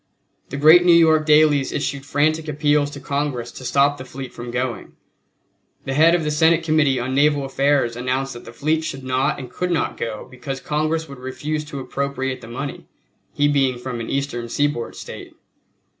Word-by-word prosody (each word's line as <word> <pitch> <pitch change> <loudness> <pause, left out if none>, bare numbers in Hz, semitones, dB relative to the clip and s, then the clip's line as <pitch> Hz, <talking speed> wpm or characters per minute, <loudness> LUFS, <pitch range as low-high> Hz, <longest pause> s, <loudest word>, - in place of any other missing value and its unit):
The 140 - -5
great 160 +5 +7
New 175 -1 +6
York 160 -2 +4
dailies 150 -2 +4
issued 140 0 -3
frantic 155 +3 +1
appeals 150 -1 +1
to 145 - -9
Congress 140 -3 -3
to - - -11
stop 140 +2 +2
the - - -6
fleet 130 0 -8
from 120 0 -7
going. 125 0 -3 0.9
The 135 - -2
head 160 +4 +5
of 170 - 0
the 150 - -1
Senate 160 +2 +3
Committee 155 -5 +2
on 125 +2 -3
Naval 145 0 +3
Affairs 135 -3 +1
announced 130 +2 -2
that 120 - -10
the - - -10
fleet 155 +6 0
should 135 -4 -5
not 130 +1 0
and 125 -3 -8
could 180 - -2
not 170 -3 -1
go 110 0 -5
because 130 +2 -6
Congress 155 +3 -1
would 140 -2 -10
refuse 150 +4 -4
to 145 -2 -7
appropriate 135 -1 -3
the - - -10
money 135 +4 -6 0.4
he 145 - +2
being 135 -3 +2
from 125 -1 -5
an 115 - -5
Eastern 135 -4 -3
seaboard 145 -2 -1
State. - - -9
140 Hz, 190 wpm, -21 LUFS, 130-150 Hz, 0.9 s, great